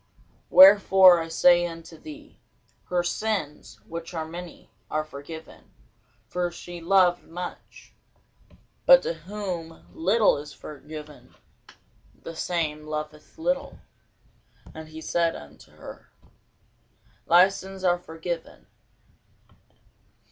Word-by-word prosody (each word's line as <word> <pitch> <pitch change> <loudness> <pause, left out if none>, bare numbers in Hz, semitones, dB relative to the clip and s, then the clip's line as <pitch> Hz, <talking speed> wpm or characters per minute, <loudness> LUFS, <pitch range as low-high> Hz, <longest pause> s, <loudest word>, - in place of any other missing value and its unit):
Wherefore 190 -2 +8
I 165 - -4
say 175 +1 +4
unto 165 0 -10
thee, 300 - -13 0.5
Her 180 -1 0
sins, 165 - -3
which 165 +1 -7
are 160 -1 -3
many, 170 +1 -10 0.2
are 155 0 -1
forgiven; 155 +2 -11 0.6
for 180 +6 -2
she 175 0 -10
loved 175 0 +3
much: 175 +2 -9 0.9
but - - +8
to - - -2
whom 170 -1 -7
little 200 +4 +2
is 145 0 -10
forgiven, 150 0 -11 0.8
the 165 - -9
same 155 -3 -3
loveth 150 - -7
little. 275 -2 -2 1.0
And 160 0 -10
he 160 0 -10
said 170 0 0
unto 75 - -13
her, - - -13 1.2
Thy 175 +3 +7
sins 195 -1 -9
are 175 -1 +2
forgiven. 165 0 -7
170 Hz, 105 wpm, -25 LUFS, 160-185 Hz, 1.2 s, Wherefore